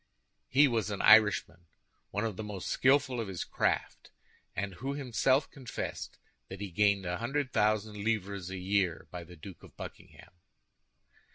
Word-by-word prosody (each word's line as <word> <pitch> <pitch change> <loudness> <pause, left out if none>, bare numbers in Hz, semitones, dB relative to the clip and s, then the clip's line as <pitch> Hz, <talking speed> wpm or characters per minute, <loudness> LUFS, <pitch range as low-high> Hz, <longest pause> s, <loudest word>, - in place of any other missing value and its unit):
He 140 +3 +6
was 115 -5 0
an 100 -1 -3
Irishman—one 105 -1 +2
of 110 -4 -3
the 110 - -5
most 105 -3 -5
skillful 130 -2 +3
of 110 - -4
his 95 -3 -4
craft, - - -1 0.5
and 100 -1 -3
who 135 +10 -4
himself 130 +1 +1
confessed 130 -4 -6 0.3
that 95 - -7
he 100 -2 -5
gained 100 +1 +2
a 90 0 -2
hundred 135 +3 -2
thousand 105 -1 +1
livres 100 -4 -2
a 95 - -5
year 95 -2 0
by 90 -1 -6
the 90 +1 -13
Duke 90 +3 -11
of - - -16
Buckingham. - - -11
105 Hz, 155 wpm, -31 LUFS, 95-120 Hz, 0.5 s, He